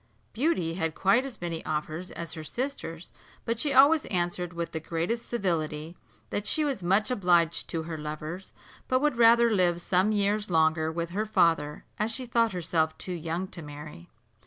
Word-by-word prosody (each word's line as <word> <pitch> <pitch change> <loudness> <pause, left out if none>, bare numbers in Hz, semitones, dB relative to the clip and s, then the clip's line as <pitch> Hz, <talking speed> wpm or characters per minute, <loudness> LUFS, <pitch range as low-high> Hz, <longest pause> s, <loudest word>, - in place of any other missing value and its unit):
Beauty 230 - 0
had 165 -3 -2
quite 235 +7 +3
as 270 -3 -8
many 170 -2 -4
offers 155 +3 -3
as 170 -1 -7
her 160 - -7
sisters, 180 - -5 0.3
but 230 0 -1
she 295 - 0
always 280 +3 +6
answered 175 -1 -1
with 170 -1 -4
the 160 - -3
greatest 170 +9 -3
civility, 165 -6 -2 0.4
that 205 0 -2
she 310 -1 +2
was 275 -8 -2
much 195 +6 +2
obliged 175 -7 +2
to 165 -2 -2
her 160 -1 -6
lovers, 155 +5 -6 0.4
but 255 - +2
would 295 -3 +1
rather 235 0 +6
live 180 -4 +2
some 185 +4 +2
years 210 0 +1
longer 160 -1 +2
with 170 +1 -3
her 210 +4 -2
father, 165 -7 +1
as 215 +2 0
she 255 +2 -2
thought 230 -1 +2
herself 165 -3 0
too 185 - -5
young 170 +2 -3
to 175 - -8
marry. 145 - -10
175 Hz, 180 wpm, -28 LUFS, 160-225 Hz, 0.4 s, always